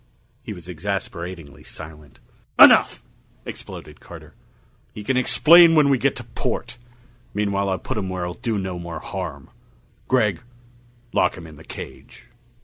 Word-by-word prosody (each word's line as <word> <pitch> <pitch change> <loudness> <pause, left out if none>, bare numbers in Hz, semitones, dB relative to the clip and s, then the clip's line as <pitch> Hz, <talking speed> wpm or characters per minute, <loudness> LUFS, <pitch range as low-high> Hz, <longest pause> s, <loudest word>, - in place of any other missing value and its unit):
He - - -8
was 90 -4 -10
exasperatingly 85 -4 -6
silent. 75 -3 -11 0.4
"Enough!" - - +7 0.4
exploded - - -9
Carter. - - -13 0.6
"He 105 - -7
can 130 +5 0
explain 165 +6 +6
when 150 -2 +5
we 135 -2 +3
get 140 +1 +1
to 125 - -6
port. 120 +1 -4 0.6
Meanwhile 100 -1 0
I'll 95 - 0
put 110 - -4
him 95 -2 -4
where 90 -1 -3
he'll 90 - -4
do 115 +1 -3
no 95 -2 -4
more 85 -1 -6
harm. 80 -9 -7 0.6
Gregg, 105 -9 +1 0.7
lock - - +2
him 85 - -10
in 80 -2 -13
the - - -14
cage." - - -11
95 Hz, 145 wpm, -22 LUFS, 85-115 Hz, 0.7 s, Enough